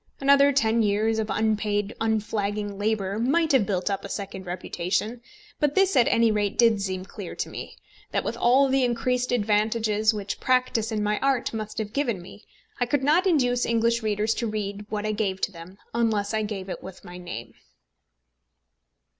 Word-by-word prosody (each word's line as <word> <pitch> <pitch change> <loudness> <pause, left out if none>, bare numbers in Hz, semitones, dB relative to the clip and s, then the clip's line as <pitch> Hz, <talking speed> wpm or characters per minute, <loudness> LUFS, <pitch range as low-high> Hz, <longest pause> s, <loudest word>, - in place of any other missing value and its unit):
Another 280 +1 +5
ten 230 -4 +2
years 215 +1 +1
of 220 -1 -2
unpaid 210 -1 0
unflagging 210 -2 -1
labour 205 -1 -1
might 310 +7 +2
have 250 -8 +3
built 185 -3 -1
up 200 -1 -1
a 200 - -7
second 190 -2 -6
reputation. 185 +6 -2 0.4
But 295 -1 +1
this 385 -3 +3
at 245 -3 +5
any 230 -1 +4
rate 205 -1 -1
did 230 -4 +4
seem 185 -1 -3
clear - - -8
to - - -3
me, - - -8 0.3
that - - -1
with - - -3
all 260 +3 +4
the 265 0 +2
increased 250 +1 0
advantages 215 -1 +2
which 205 -2 -5
practice 255 -3 +1
in 215 -1 -1
my 210 0 0
art 265 -3 0
must 215 -1 -5
have 210 -1 -3
given 245 -8 0
me, 185 +4 -13 0.4
I 245 - +1
could 270 +2 0
not 325 +7 +3
at - - +4
once 305 -7 +4
induce 245 0 +1
English 235 0 +2
readers 215 0 0
to 235 - -2
read 205 -1 -4
what 210 -1 -3
I 215 - 0
gave 205 -3 -1
to - - 0
them, 175 +2 -12 0.2
unless 220 -3 0
I 220 - +1
gave 205 -3 -4
it 185 - -6
with 190 -1 -11
my 180 0 -9
name. 175 -10 -7
215 Hz, 190 wpm, -25 LUFS, 205-240 Hz, 0.4 s, Another